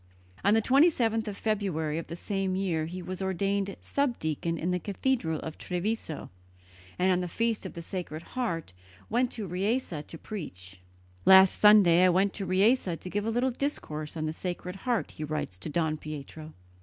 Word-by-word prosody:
On 205 +2 +5
the 225 - +3
27th 245 -6 +3
of 200 -1 -4
February 180 -8 -1
of 165 - -7
the 170 - -6
same 195 +1 -2
year 170 -5 0
he 180 +2 -6
was 185 +1 -5
ordained 195 +1 -1
subdeacon 170 - -1
in 175 +3 -1
the 180 - 0
cathedral 200 - -1
of 160 - -7
Treviso, 180 -3 -3 0.7
and 185 +1 +3
on 180 0 +2
the 180 - -2
feast 225 +2 -1
of - - -10
the 170 - -7
Sacred 170 -3 -5
Heart 170 - -2 0.4
went 245 +2 +2
to 220 - -4
Riese 195 +6 -1
to 165 - -8
preach. 95 - -8 0.4
"Last 190 0 +7
Sunday 200 -5 +7
I 185 - +6
went 190 +2 +2
to 195 -2 -4
Riese 190 -1 +3
to 185 - -7
give 205 +1 -1
a - - +2
little 245 +3 +1
discourse 160 - -3
on 155 - -2
the 155 - -2
Sacred 180 +1 -5
Heart," 240 +2 -1
he 155 - -7
writes 150 -12 -3
to - - -5
Don 155 0 0
Pietro. 155 +1 -8
185 Hz, 180 wpm, -29 LUFS, 160-215 Hz, 0.7 s, Last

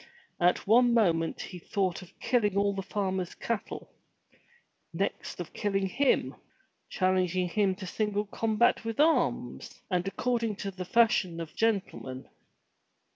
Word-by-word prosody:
At 175 +1 +2
one 240 +3 +5
moment 165 -7 +2
he 180 - -7
thought 190 0 -1
of 180 - -16
killing 210 -6 +1
all 200 0 +2
the 195 - -3
farmer's 190 -2 -2
cattle; 230 -3 -4 1.0
next - - -3
of - - -6
killing 195 -2 0
him; 270 +8 +1 0.6
challenging 185 -1 +1
him 195 0 +1
to 190 0 -8
single 210 +2 -1
combat 225 +3 +1
with 225 -1 -4
the 295 - +6
arms, 325 +1 0
and 180 +1 0
according 230 +2 -1
to 200 0 -5
the 185 -1 -6
fashion 185 -4 +3
of 165 -2 -6
gentlemen. 195 - -2
195 Hz, 135 wpm, -29 LUFS, 185-225 Hz, 1.0 s, the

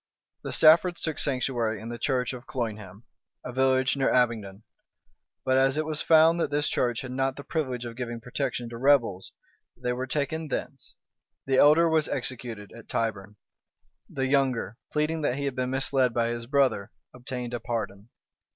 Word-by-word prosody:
The - - -5
Staffords 170 +3 +5
took 160 -2 -2
sanctuary 120 -5 0
in 110 +2 -7
the 120 0 -6
church 125 0 0
of 125 0 -9
Colnham, 110 -4 -5 0.4
a 125 - -6
village 130 +1 +2
near 135 -1 +1
Abingdon; 110 -5 0 0.8
but 130 0 +3
as 135 +1 +3
it 155 - 0
was 155 -1 -2
found 165 +1 +5
that 165 - 0
this 145 0 +1
church 120 -2 0
had 130 - -7
not 135 +1 -1
the 140 - -8
privilege 130 -7 -3
of 115 -1 -7
giving 120 -1 -5
protection 125 0 -3
to 115 0 -8
rebels, 120 -9 +2 0.5
they 125 0 -2
were 130 +1 -4
taken 155 +3 -2
thence; - - -6 0.5
the 135 -1 +1
elder 155 +4 +6
was 160 -2 +2
executed 120 -5 -4
at 115 - -13
Tyburn; 105 -2 -2 0.7
the 135 - -2
younger, 130 -5 +1 0.2
pleading 155 +1 0
that 135 -4 0
he 140 +1 -3
had 140 - -1
been 125 -1 -1
misled 135 -2 +1
by 115 -1 +1
his 120 0 -4
brother, 130 -7 +1 0.2
obtained 125 -1 -6
a 120 - -2
pardon. 105 -2 -4
130 Hz, 175 wpm, -27 LUFS, 115-140 Hz, 0.8 s, elder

